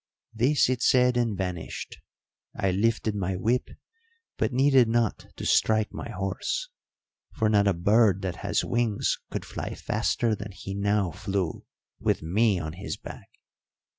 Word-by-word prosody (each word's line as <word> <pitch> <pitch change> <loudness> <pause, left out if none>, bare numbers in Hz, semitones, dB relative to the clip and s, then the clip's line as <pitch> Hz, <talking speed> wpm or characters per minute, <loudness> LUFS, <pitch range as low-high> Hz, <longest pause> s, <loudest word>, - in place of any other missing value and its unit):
"This 125 +6 +3
it 125 -1 -1
said 125 -1 +4
and 115 -4 0
vanished. 90 -3 -5 0.6
I 95 - 0
lifted 110 +2 +1
my 95 -2 -2
whip, 115 +7 0 0.7
but - - 0
needed 130 -1 +5
not 115 -2 0
to - - -6
strike 110 0 +2
my - - -6
horse, 120 - -3 0.7
for 110 -2 +2
not 100 -1 +4
a 100 - +4
bird 100 +2 +3
that 90 -3 -3
has 105 0 -1
wings 120 -4 0
could - - -4
fly - - -5
faster 115 -2 0
than 100 -1 -6
he 95 0 -7
now 100 -2 +1
flew 95 0 -3 0.3
with - - 0
me 100 +5 +2
on 80 -2 -4
his 95 +4 -5
back. - - -10
105 Hz, 150 wpm, -27 LUFS, 95-120 Hz, 0.7 s, needed